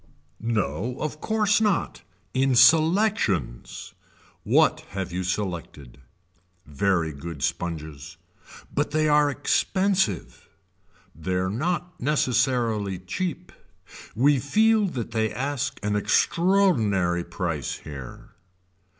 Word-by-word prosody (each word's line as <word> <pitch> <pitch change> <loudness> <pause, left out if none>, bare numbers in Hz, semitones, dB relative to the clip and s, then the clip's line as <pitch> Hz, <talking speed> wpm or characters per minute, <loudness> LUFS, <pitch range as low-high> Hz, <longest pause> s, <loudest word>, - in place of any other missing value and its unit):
No 110 - -2
of 155 0 -4
course 215 -1 +2
not 210 -5 0 0.3
in 130 0 +2
selections. 155 - +2 0.5
What - - +3 0.2
have 95 -3 -3
you 90 +1 -3
selected. 85 -8 -4 0.7
Very 80 +2 0
good 70 0 -7
sponges. 80 -2 -4 0.6
But - - 0
they 155 +1 +1
are 150 -1 +4
expensive. 185 - 0 0.6
They 80 +5 -4
are 95 +1 0
not 175 - -3
necessarily 120 -7 +1
cheap. 135 - -4 0.6
We 140 +4 +4
feel 215 - +3
that 120 - -5
they 110 -1 0
ask 140 0 -3
an 105 0 0
extraordinary 110 - +2
price 85 -6 -3
here. 70 -5 -10
115 Hz, 100 wpm, -25 LUFS, -, 0.7 s, are